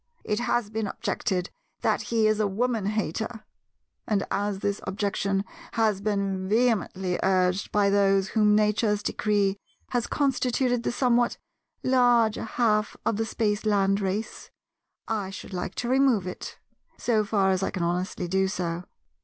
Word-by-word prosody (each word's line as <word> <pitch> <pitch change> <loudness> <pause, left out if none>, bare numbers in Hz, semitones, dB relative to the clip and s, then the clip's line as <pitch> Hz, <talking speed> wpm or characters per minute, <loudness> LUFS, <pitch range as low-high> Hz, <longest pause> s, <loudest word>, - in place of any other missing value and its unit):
It 210 0 -1
has 240 -3 0
been 220 -1 -2
objected 180 -2 -2 0.3
that - - +1
he 225 -2 +2
is 215 0 +3
a 210 - +2
woman 220 +1 -1
hater; 215 +2 -3 0.6
and 205 -3 +1
as 200 0 0
this 200 +1 -2
objection 195 0 -1 0.3
has 215 -4 +1
been 195 -2 -1
vehemently 205 -5 +1
urged 185 0 +1
by 200 -1 +3
those 195 -1 +3
whom 210 -2 +3
Nature's 210 0 +2
decree 205 -2 +1 0.3
has 245 -2 -1
constituted 255 -3 +1
the - - -1
somewhat 240 -1 +2 0.5
larger 245 -4 +3
half 215 -2 +1
of 220 - +1
the 225 0 -1
Spaceland 205 -3 +1
race, 200 +3 -3 0.6
I 210 -4 -2
should 195 0 -9
like 180 +1 -4
to 240 - -3
remove 260 -6 +3
it, 180 - -7 0.4
so 220 -3 +1
far 200 -2 +2
as 185 0 +1
I 195 - 0
can 185 - -3
honestly 180 +1 -2
do 190 +2 +1
so. 175 -3 -3
210 Hz, 145 wpm, -26 LUFS, 195-225 Hz, 0.6 s, is